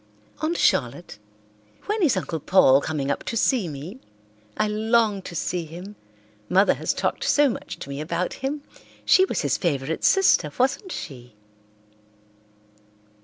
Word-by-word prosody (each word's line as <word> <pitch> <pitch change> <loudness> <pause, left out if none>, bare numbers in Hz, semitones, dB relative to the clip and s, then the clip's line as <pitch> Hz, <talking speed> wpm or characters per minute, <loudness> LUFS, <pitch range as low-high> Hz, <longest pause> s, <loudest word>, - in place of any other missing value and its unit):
"Aunt 325 +2 -1
Charlotte, 125 -1 0 0.7
when 425 +1 -1
is 290 - +3
Uncle 170 -3 -3
Paul 140 -4 +5
coming 145 -3 -2
up - - -3
to 230 - -3
see 230 -4 +2
me? 155 - -8 0.6
I 215 - +1
long 215 -1 +1
to 180 - -9
see 175 +1 -2
him; 180 +6 -10 0.5
Mother 195 +3 +4
has - - -2
talked - - -2
so 290 -1 +4
much 230 - -6
to - - -9
me 140 +1 -5
about 170 +3 -2
him. 285 +2 -3 0.4
She 375 - +6
was - - -2
his - - 0
favourite 150 -3 -2
sister, 385 - +4
wasn't 275 +10 0
she?" 125 - -8
185 Hz, 145 wpm, -24 LUFS, -, 0.7 s, She